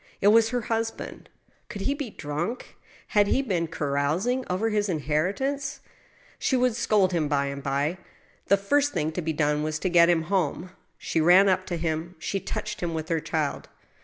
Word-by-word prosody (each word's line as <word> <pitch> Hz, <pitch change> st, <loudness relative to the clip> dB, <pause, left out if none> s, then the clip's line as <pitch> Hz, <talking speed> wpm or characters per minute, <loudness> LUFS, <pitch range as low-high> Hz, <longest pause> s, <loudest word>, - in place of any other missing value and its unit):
It 200 Hz, -, +5 dB
was 225 Hz, +1 st, +5 dB
her 245 Hz, +1 st, -1 dB
husband. 225 Hz, 0 st, -4 dB, 0.4 s
Could 210 Hz, -4 st, -6 dB
he 275 Hz, -, +1 dB
be 285 Hz, -4 st, -5 dB
drunk? 165 Hz, +7 st, -5 dB, 0.3 s
Had 205 Hz, -2 st, +3 dB
he 270 Hz, -, +2 dB
been 180 Hz, -9 st, -1 dB
carousing 160 Hz, -, 0 dB
over 205 Hz, +5 st, 0 dB
his 210 Hz, -1 st, 0 dB
inheritance? 190 Hz, -, -1 dB, 0.6 s
She 260 Hz, -, +1 dB
would 250 Hz, -2 st, +2 dB
scold 210 Hz, -5 st, +2 dB
him 160 Hz, -3 st, +1 dB
by 140 Hz, -1 st, +1 dB
and 140 Hz, 0 st, -5 dB
by. 140 Hz, +5 st, -1 dB, 0.5 s
The 200 Hz, -, +5 dB
first 285 Hz, +9 st, +1 dB
thing 155 Hz, +1 st, -1 dB
to 180 Hz, -, -3 dB
be 160 Hz, -1 st, -1 dB
done 150 Hz, -1 st, +1 dB
was 155 Hz, 0 st, -2 dB
to 185 Hz, -, -1 dB
get 170 Hz, -1 st, +6 dB
him 165 Hz, -2 st, +3 dB
home. 180 Hz, 0 st, -1 dB, 0.3 s
She 165 Hz, -, -1 dB
ran 180 Hz, +5 st, +6 dB
up 185 Hz, -1 st, +1 dB
to 175 Hz, -, -2 dB
him. 165 Hz, +2 st, -3 dB
She 195 Hz, +5 st, -3 dB
touched -, -, -5 dB
him 170 Hz, -2 st, -2 dB
with 160 Hz, 0 st, -4 dB
her 165 Hz, -1 st, +1 dB
child. 155 Hz, -2 st, -3 dB
175 Hz, 190 wpm, -26 LUFS, 155-215 Hz, 0.6 s, get